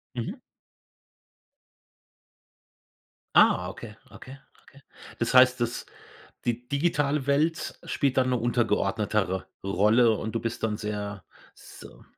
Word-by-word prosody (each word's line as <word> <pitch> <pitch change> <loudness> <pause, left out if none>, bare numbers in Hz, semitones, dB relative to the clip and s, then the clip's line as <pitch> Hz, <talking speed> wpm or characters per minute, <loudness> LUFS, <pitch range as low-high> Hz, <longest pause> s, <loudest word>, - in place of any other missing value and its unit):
Mhm. 120 - -4 3.0
Ah, 90 0 +5
okay, 105 +2 -10
okay, 135 +2 -12 0.3
okay. 140 - -19 0.4
Das 120 - -1
heißt, 125 -1 +6
dass 120 0 -2 0.6
die 120 +1 -2
digitale 145 -2 0
Welt 155 +4 0
spielt 135 -3 -1
dann 130 0 +3
'ne 125 - +1
untergeordnetere 105 -4 0 0.2
Rolle 105 +5 +3
und 110 - -5
du 115 - -1
bist 115 0 -5
dann 105 -1 0
sehr, 105 -3 -5 0.3
so - - -14
120 Hz, 110 wpm, -26 LUFS, 105-130 Hz, 3.0 s, heißt